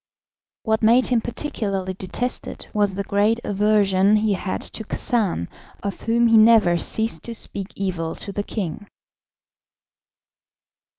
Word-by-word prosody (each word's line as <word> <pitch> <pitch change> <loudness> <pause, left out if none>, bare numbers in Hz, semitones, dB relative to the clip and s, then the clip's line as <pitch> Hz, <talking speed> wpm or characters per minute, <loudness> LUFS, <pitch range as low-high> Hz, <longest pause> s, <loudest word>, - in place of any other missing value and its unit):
What 220 -1 0
made 235 +3 +5
him 245 -2 +2
particularly 205 -7 -3
detested 195 +7 -5
was 205 -2 +1
the 200 - -2
great 205 +4 +1
aversion 205 -1 +3
he 215 -1 +2
had 185 0 -3
to 220 - -6
Khacan, 205 - -1 0.4
of 200 -1 -4
whom 235 +1 +2
he 230 -1 +5
never 215 -5 +6
ceased 220 +6 0
to 235 - -3
speak 200 -3 -3
evil 180 -4 -3
to 200 - -5
the 205 - -2
king. 205 -1 -5
210 Hz, 130 wpm, -22 LUFS, 195-225 Hz, 0.4 s, never